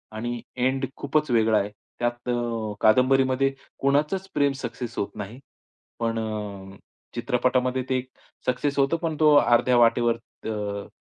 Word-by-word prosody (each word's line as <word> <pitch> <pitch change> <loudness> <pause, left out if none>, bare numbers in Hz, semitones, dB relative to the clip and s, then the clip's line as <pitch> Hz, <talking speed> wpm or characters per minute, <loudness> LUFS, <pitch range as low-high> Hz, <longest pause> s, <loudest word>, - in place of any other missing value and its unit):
आणि 120 +1 -3 0.2
एंड 130 +2 +1
खूपच 150 +1 0
वेगळा 110 -2 +4
आहे. 100 +1 -2 0.3
त्यात 120 +1 -2
अ, 115 -3 -1
कादंबरीमध्ये 130 +3 +4 0.3
कोणाचंच 150 +8 +1
प्रेम 145 -1 +3
सक्सेस 120 0 -5
होत 100 - -1
नाही. 105 +4 -7 0.6
पण 115 -1 0
अ, 100 -3 -5 0.4
चित्रपटामध्ये 125 +1 +1
ते 130 - +2
एक 130 +1 -5 0.4
सक्सेस 135 +3 0
होतं 140 +5 +3
पण 160 -2 -1
तो 150 -1 +6
अर्ध्या 120 -2 +4
वाटेवर 120 0 +4 0.3
अ, 105 -2 -3
120 Hz, 135 wpm, -25 LUFS, 110-135 Hz, 0.6 s, तो